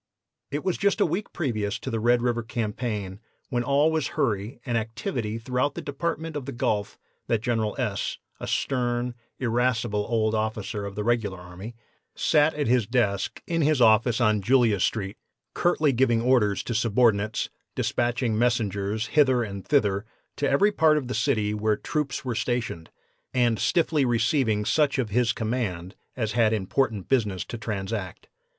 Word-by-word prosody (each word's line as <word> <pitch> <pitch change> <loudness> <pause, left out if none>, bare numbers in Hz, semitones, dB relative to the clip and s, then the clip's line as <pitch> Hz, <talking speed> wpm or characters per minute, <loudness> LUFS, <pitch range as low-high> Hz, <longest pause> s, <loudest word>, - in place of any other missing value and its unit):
"It 145 +2 -3
was 185 -2 -1
just 200 +2 +2
a - - +4
week 180 +6 -2
previous 110 -10 -2
to 130 - -6
the 115 - -1
Red 120 +2 +3
River 120 -1 +1
campaign, 110 -4 -3 0.3
when 120 -3 0
all 140 +4 +3
was 160 -3 0
hurry 110 -6 -1
and 120 - -1
activity 115 0 -2
throughout 125 +4 -1
the - - -4
Department 160 +2 -3
of 140 -3 -5
the - - -3
Gulf, 110 -5 -1 0.3
that 115 -2 0
General 115 -4 0
S., 110 -6 -2 0.2
a - - -6
stern, 120 -2 -1 0.2
irascible 120 -3 0
old 110 -2 +1
officer 110 -1 -2
of 100 - -8
the 105 - -2
regular 110 -4 0
army, 90 +6 -9 0.4
sat 150 0 +3
at 145 -1 -1
his 120 -3 +2
desk 110 -6 0
in 165 -1 0
his 150 -1 +3
office 115 +1 +4
on 110 -3 +3
Julia 115 -2 +3
street, 95 +1 -1 0.4
curtly 155 -4 +2
giving 120 -2 +3
orders 115 -5 +2
to 120 - -3
subordinates, 110 -2 +2 0.2
dispatching 120 -1 0
messengers 110 -2 0
hither 130 -1 +3
and 100 -3 -6
thither 100 -9 +2 0.3
to 145 - +1
every 200 +10 +4
part 160 -5 +4
of 130 -5 -3
the - - -2
city 110 -8 +1
where 105 0 +1
troops 150 -4 -3
were 125 - -1
stationed, 120 -8 -2 0.5
and 120 -3 +2
stiffly 160 -4 +2
receiving 115 -2 +1
such 150 +1 +2
of 120 -5 -1
his 120 +1 +2
command 110 -6 -3 0.2
as 110 -4 -1
had 110 0 +3
important 110 0 -1
business 105 -8 0
to 120 - -6
transact. 100 -3 -4
120 Hz, 165 wpm, -26 LUFS, 105-130 Hz, 0.5 s, a